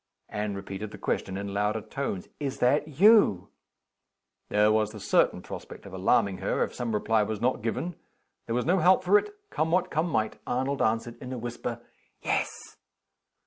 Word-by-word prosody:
Anne 105 -1 -3
repeated 100 +2 -6
the - - -10
question 95 0 -2
in 100 0 -5
louder 105 +2 0
tones: 105 -6 -4
"Is 140 -2 -3
that 140 +5 +2
you?" 160 - +5 1.0
There 105 +1 +4
was 110 -1 +2
the 105 - -8
certain - - +2
prospect - - -9
of 100 - -10
alarming 100 0 +2
her, - - 0
if - - -4
some 115 -3 -2
reply 110 +1 +2
was 105 0 -2
not 125 +1 0
given. 115 +10 -2 0.5
There 115 - -1
was 125 - 0
no 185 +3 +3
help 185 +1 +5
for 200 +3 +6
it. - - -7 0.2
Come 160 - 0
what 180 +2 +1
come 160 +2 0
might, 110 -7 -1
Arnold 130 +3 -1
answered, 115 +1 0
in 130 -1 -7
a 130 - -3
whisper: 120 0 -5 0.4
"Yes." - - -3
115 Hz, 180 wpm, -28 LUFS, 105-140 Hz, 1.0 s, for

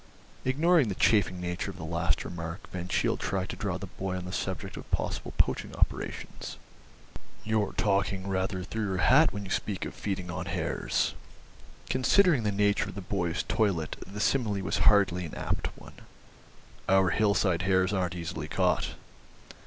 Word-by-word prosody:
Ignoring 150 +2 +4
the 100 - -2
chaffing 95 -5 +3
nature 90 +2 -3
of 95 - -8
the 80 - -7
last 85 +1 0
remark 85 +1 -6
Van 90 -1 -4
Cheele - - +1
tried 95 -1 -2
to - - -4
draw 95 -3 -2
the 100 - -6
boy 95 -1 -4
on 90 - -5
the 90 - -6
subject - - -3
of - - -9
possible - - -2
poaching - - +1
operations. - - -2 0.9
"You're 110 -2 0
talking 100 -1 +1
rather 95 0 -1
through 110 +3 -3
your 95 -1 -1
hat 140 - +5
when 100 0 -5
you 95 - -8
speak 100 -3 -1
of - - -6
feeding 95 -3 -3
on 90 - -4
hares." - - 0 0.7
(Considering 150 +3 +4
the 105 -2 0
nature 100 0 +2
of 95 - -9
the 100 - -5
boy's 90 -2 -1
toilet 95 -8 0
the 100 +2 -7
simile 105 -5 +1
was 85 -2 -1
hardly 100 -4 +3
an 80 - -7
apt - - -1
one.) - - -13 1.0
"Our 95 -1 +5
hillside 100 -4 +2
hares 95 +1 +2
aren't 90 -3 0
easily 85 -2 -4
caught." - - +1
95 Hz, 170 wpm, -29 LUFS, 90-105 Hz, 1.0 s, hat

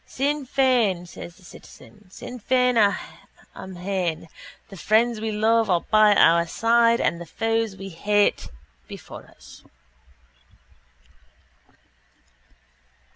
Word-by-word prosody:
—Sinn 285 +1 -3
Fein! 240 -10 +1
says 170 0 -11
the 185 - -22
citizen. 205 +2 -16
Sinn 250 +6 -10
Fein 250 +2 +1 0.8
amhain! 180 -3 -4 0.4
The 195 - -11
friends 220 +4 +1
we 220 0 -3
love 220 +1 +1
are 175 -2 +2
by 215 -1 +5
our 170 -1 +4
side 230 +4 +2
and 170 - -1
the 170 - -9
foes 225 -1 -2
we 195 0 -8
hate 205 +4 0 0.4
before - - -11
us. - - -17
215 Hz, 105 wpm, -23 LUFS, 185-235 Hz, 0.8 s, by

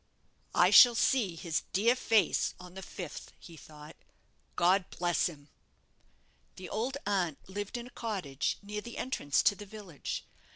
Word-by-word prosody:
"I - - +5
shall 240 -1 +9
see 220 -7 +2
his 165 -1 -2
dear 230 +6 +3
face 220 -7 +2
on 180 -1 -12
the 190 - -8
fifth," 175 -4 -8
he 170 - -13
thought; 150 0 -13 0.6
"God 185 +2 +3
bless 175 -1 0
him!" 145 -4 -11 1.1
The 185 -1 -9
old 245 +6 -2
aunt 180 -7 0
lived 205 +4 -5
in 240 - -6
a - - -11
cottage 185 - -3
near 210 +1 -5
the 235 +2 -9
entrance 155 - 0
to - - +5
the 205 0 -10
village. 195 -7 -7
190 Hz, 155 wpm, -31 LUFS, 165-215 Hz, 1.1 s, shall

